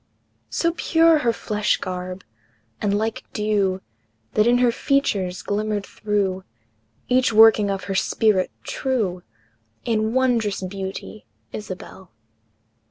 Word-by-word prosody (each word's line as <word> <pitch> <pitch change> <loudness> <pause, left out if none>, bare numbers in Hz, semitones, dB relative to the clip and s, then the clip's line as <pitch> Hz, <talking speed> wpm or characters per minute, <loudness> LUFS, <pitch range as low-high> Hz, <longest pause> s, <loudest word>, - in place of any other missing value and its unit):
So 335 0 0
pure 330 -2 +4
her 240 -4 +2
flesh 210 -2 0
garb, 185 0 -5 0.6
and 205 -1 +1
like 220 +1 -2
dew, 205 -3 0 0.5
That 215 +2 +3
in 240 +1 +5
her 245 -1 +4
features 200 -10 0
glimmered 210 0 -1
through 200 -3 -2 0.6
Each 255 -1 +3
working 220 -2 +6
of 195 -1 -2
her 195 +2 -3
spirit 195 0 +2
true, 215 -9 -1 0.6
In 220 0 0
wondrous 230 -7 +1
beauty, 190 +2 -6 0.3
Isabel! 190 -2 -8
210 Hz, 110 wpm, -22 LUFS, 190-230 Hz, 0.6 s, working